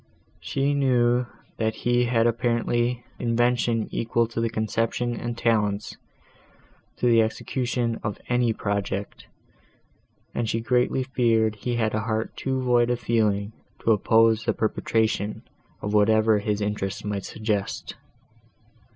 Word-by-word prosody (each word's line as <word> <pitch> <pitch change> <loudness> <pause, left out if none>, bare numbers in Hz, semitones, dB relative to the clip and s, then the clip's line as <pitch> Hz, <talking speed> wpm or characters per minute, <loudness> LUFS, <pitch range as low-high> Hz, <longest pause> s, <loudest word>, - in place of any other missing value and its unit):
She 135 - -1
knew, 125 -3 +2 0.3
that 110 -1 0
he 120 0 +1
had 115 -1 +2 0.9
invention 120 -1 +1
equal 115 0 0
to 115 - -3
the 115 - +1
conception 115 +2 -1
and 120 0 -4
talents 105 -3 0 1.0
to - - -2
the 115 -2 +5
execution 120 +1 -1
of 105 -2 -4
any 120 -1 +2
project, 100 -1 -3 1.1
and 115 -2 -1
she 115 - 0
greatly 125 +2 +1
feared 115 -4 +2
he 120 +3 -3
had 110 -2 0
a 110 - +1
heart 110 0 -2
too 130 -1 -2
void 120 -1 +3
of 120 -1 0
feeling 105 -2 0 0.3
to 115 - +3
oppose 110 +1 +4
the - - +1
perpetration 110 -1 -1 0.4
of 105 - -2
whatever 110 +1 +4
his 105 0 -1
interest 105 -2 -3
might 100 -2 -3
suggest. 105 -3 -3
115 Hz, 125 wpm, -25 LUFS, 105-120 Hz, 1.1 s, the